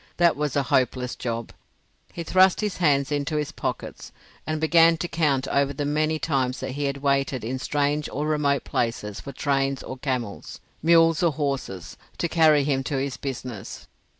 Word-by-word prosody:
That 170 -1 +4
was 150 -2 -2
a 140 - +2
hopeless 125 -1 0
job; 115 -1 -4 0.6
he 170 - -5
thrust 185 +4 +4
his 210 -2 -2
hands 140 -5 +2
into 145 +2 -1
his 150 -1 -1
pockets - - -5 0.4
and 155 0 -1
began 165 +1 +5
to 175 - -3
count 145 -6 0
over 140 0 +1
the 145 +1 -3
many 155 +2 +1
times 135 -5 -1
that - - -4
he 145 +2 -3
had 140 0 -3
waited 135 -3 +1
in 130 +4 -3
strange 145 +2 0
or 145 +2 -2
remote 145 -3 +1
places 105 -3 -2
for 140 - -8
trains 135 0 -1
or 130 - -7
camels, 125 -6 -4 0.2
mules 165 0 +4
or 170 -3 +2
horses, 130 - -4 0.2
to 170 - 0
carry 155 -3 +4
him 135 -2 0
to 140 - -1
his 135 -1 -2
business. 125 -6 -6
140 Hz, 180 wpm, -25 LUFS, 130-155 Hz, 0.6 s, began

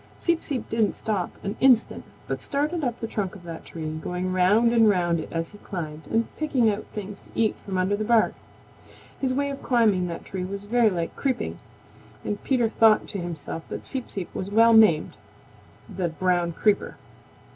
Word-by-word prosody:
Seep 340 -1 +1
Seep 265 -6 -2
didn't 220 -3 +1
stop 205 -5 -2
an 200 +1 -3
instant 255 -4 +4 0.2
but - - -3
started 300 +3 -1
up 245 -3 -2
the - - -3
trunk 205 -3 -3
of 190 - -12
that 165 -1 -8
tree, 155 -1 -5
going 180 +2 -3
round 205 +6 +4
and 225 -2 +6
round 175 -4 +2
it 155 - -7
as 165 0 -3
he 205 - -14
climbed, 160 -6 -6
and 230 +1 +1
picking 260 -8 +2
out 205 +1 -4
things 205 -1 -7
to - - -21
eat 220 -2 +2
from 195 -2 -3
under 185 +2 +1
the 215 - -2
bark. 230 0 +3 0.9
His 265 -2 0
way 280 +2 0
of 275 - -7
climbing 215 -7 +2
that 170 - -6
tree 190 -2 -4
was 200 +2 -5
very 235 +1 +3
like 170 -4 -3
creeping, 260 -3 -2 0.7
and 205 - -3
Peter 250 -4 +2
thought 220 -1 +4
to 200 - -3
himself 170 -2 -5
that - - -6
Seep 260 -3 -5
Seep 190 -3 -5
was 190 - -4
well 230 +2 +5
named 215 -9 +5 0.7
the 180 -3 -2
Brown 175 0 0
Creeper. 210 +4 +1
205 Hz, 190 wpm, -25 LUFS, 180-230 Hz, 0.9 s, and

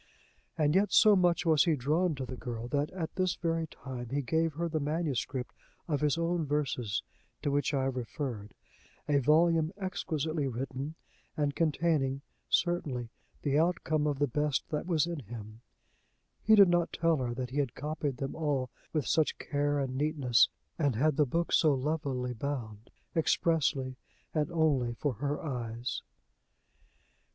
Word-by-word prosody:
And 150 -1 +3
yet 200 +3 +3
so 215 -1 +7
much 175 -1 +2
was 155 -4 +5
he 165 - +3
drawn 155 +6 +1
to 130 -1 -4
the 130 - -6
girl, 120 -1 -5
that, 145 +3 0
at 175 -4 -5
this 185 -1 +1
very 165 -1 -1
time, 125 -5 -7
he 140 +2 -1
gave 160 +4 +1
her 170 +3 -2
the 160 -1 -1
manuscript 145 -4 -2 0.3
of 150 -4 0
his 150 +1 +2
own 170 0 0
verses 130 -8 -1 0.4
to 145 - +1
which 145 +1 +1
I 135 -3 +1
have 135 -1 -1
referred 120 -4 -5 0.5
a 145 -1 +3
volume 160 +3 +4
exquisitely 160 -6 -2
written, 135 +4 -4 0.4
and 145 -2 +1
containing, 150 -4 +1 0.3
certainly, 145 -9 0 0.3
the 145 0 +2
outcome 160 -3 +1
of 145 -2 0
the 145 - +3
best 150 +1 -1
that 155 +1 -2
was 165 -4 +2
in 170 -2 -4
him: 110 -2 -9 0.8
he 220 - +6
did 200 -2 +8
not 175 -1 +2
tell 165 -1 +2
her 120 -3 -2
that 125 0 -4
he 140 - -4
had 135 -5 -1
copied 150 -2 -3
them 135 +1 -3
all 145 -5 -1 0.2
with 155 -4 0
such 160 -2 +2
care 145 -1 0
and 135 -2 -2
neatness, 140 -4 +3 0.3
and 140 -6 +2
had 150 +5 +2
the 150 -1 +3
book 170 +6 -1
so 155 -4 +5
lovelily 135 -3 -2
bound, 115 -4 -5 0.3
expressly 150 -5 +1 0.4
and 150 -2 0
only 140 -8 +2
for 145 +2 -1
her 145 +1 -1
eyes.. 120 -4 -3
145 Hz, 160 wpm, -31 LUFS, 130-160 Hz, 0.8 s, did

